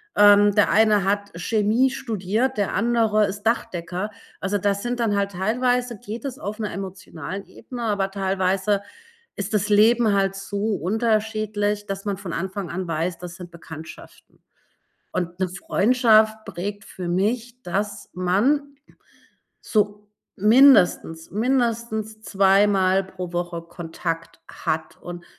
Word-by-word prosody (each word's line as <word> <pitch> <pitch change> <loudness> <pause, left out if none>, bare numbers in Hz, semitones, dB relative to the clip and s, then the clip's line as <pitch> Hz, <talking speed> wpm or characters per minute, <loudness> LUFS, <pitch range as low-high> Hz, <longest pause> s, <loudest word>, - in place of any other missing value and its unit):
ähm, 205 0 +7
der 205 0 +4
eine 215 -2 +4
hat 200 +1 -1
Chemie 220 +7 +2
studiert, 230 0 -2
der 200 -2 0
andere 220 -1 +2
ist 200 +1 -5
Dachdecker. 185 -3 -2 0.3
Also, 200 +2 -1
das 200 +1 0
sind 245 0 -2
dann 225 -3 +1
halt 200 0 0
teilweise 245 +5 0
geht 225 +1 -7
es 265 -2 -4
auf 215 -7 -6
'ner 210 -2 -3
emotionalen 190 -1 -6
Ebene, 245 +1 -9
aber 200 -3 0
teilweise 195 +1 0 0.5
ist 200 +2 -3
das 205 0 0
Leben 220 +1 +5
halt 195 -1 +1
so 200 +2 -2
unterschiedlich, 215 +1 0
dass 195 0 -5
man 200 -2 -1
von 190 -3 -6
Anfang 190 +1 -4
an 185 +1 -4
weiß, 165 +2 -2
das 175 -1 -8
sind 175 0 -10
Bekanntschaften. 160 -2 -12 0.7
Und 175 0 -4
'ne 185 - +1
Freundschaft 220 +3 +3
prägt 200 +2 -5
für 180 -2 -7
mich, 230 +7 -1
dass 205 +3 -3
man 250 +11 +1 0.9
so 210 -1 -1 0.3
mindestens, 210 -7 +5
mindestens 225 -1 -1
2 195 -1 +4
Mal 190 -1 +2
pro 185 -2 -7
Woche 175 -1 -2
Kontakt 165 0 -5
hat. 160 0 -3
Und 175 -1 -8
205 Hz, 135 wpm, -23 LUFS, 185-220 Hz, 0.9 s, ähm